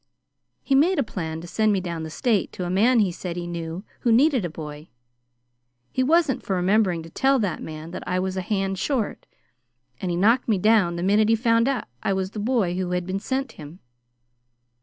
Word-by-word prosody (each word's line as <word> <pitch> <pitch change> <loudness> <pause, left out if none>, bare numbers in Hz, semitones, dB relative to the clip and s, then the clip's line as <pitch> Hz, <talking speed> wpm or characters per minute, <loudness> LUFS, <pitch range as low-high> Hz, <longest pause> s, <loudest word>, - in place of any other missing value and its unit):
He 275 - 0
made 330 +7 +4
a 280 - +3
plan 160 -7 -5
to 175 - -9
send 215 +5 +1
me 200 - +2
down 170 -3 -4
the 160 - -5
State 220 - 0
to 180 - -4
a 175 - -3
man 230 +7 +4
he 195 -3 +1
said 175 0 -6
he 175 - -4
knew 170 +1 -5 0.2
who 235 - +1
needed 260 0 +4
a 175 - -2
boy. 150 -1 -8 1.0
He 260 - 0
wasn't 305 0 +2
for 195 - -2
remembering 180 -2 +2
to 165 - -12
tell 270 +6 +2
that 200 -9 -2
man 155 +1 -7
that 180 - -6
I 180 - 0
was 185 0 -2
a 190 - -1
hand 195 0 -2
short, 250 -2 -2 0.7
and 185 - -2
he 170 - -1
knocked 230 +7 +3
me 215 -4 +2
down 200 -3 +3
the 170 - -3
minute 210 +3 +3
he 225 - +5
found 230 +2 +2
I 195 - -3
was 190 0 -2
the 215 - -6
boy 210 -6 0
who 185 -1 -2
had 180 -1 -1
been 190 +2 -2
sent 265 +3 -2
him. 155 -1 -11
195 Hz, 215 wpm, -24 LUFS, 175-230 Hz, 1.0 s, he